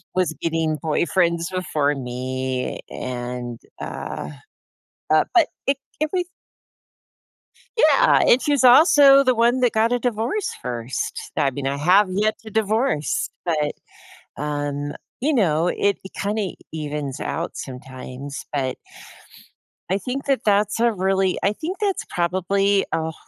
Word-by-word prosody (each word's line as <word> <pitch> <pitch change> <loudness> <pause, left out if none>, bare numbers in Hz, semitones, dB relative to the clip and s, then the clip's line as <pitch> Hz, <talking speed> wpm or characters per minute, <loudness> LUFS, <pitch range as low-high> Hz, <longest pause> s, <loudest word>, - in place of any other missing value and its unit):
was 180 -3 +1
getting 160 -2 0
boyfriends 170 +2 +1
before 155 -6 0
me, 130 0 -3
and, 120 -1 -5 0.2
uh 75 - -5 0.8
uh, 155 - +5
but 340 -4 +5 0.2
it 275 - +2 0.2
if 310 0 0
we 360 -1 +1 1.5
Yeah. - - +5
And 250 - +5
she's 285 -3 +1
also 275 +1 +7
the 255 -1 +3
one 235 +3 +3
that 245 -2 +3
got 225 +2 +2
a 245 - +2
divorce 245 - -1
1st. 120 0 -4
I 140 - +2
mean, 135 +1 -5
I 140 +1 0
have 185 +7 +4
yet 210 +3 0
to 220 - -11
divorce, 220 - 0
but, 150 -4 0 0.6
um, 145 0 -3 0.3
you 295 +5 +1
know, 175 - +2
it 200 +2 +1
it 190 - -10
kinda 205 -1 -2 0.2
evens 150 -3 -4
out 170 +2 -3
sometimes. 130 +1 -8
But 135 -3 -1 1.1
I 195 - +2
think 260 +5 -4
that 270 -4 +1
that's 210 +1 +2
a 235 -1 +4
really 190 -1 +1
I 200 - +2
think 335 - -5
that's 405 -3 -1
probably, 195 +3 +1
ugh, 160 0 -1
185 Hz, 135 wpm, -22 LUFS, 145-230 Hz, 1.5 s, also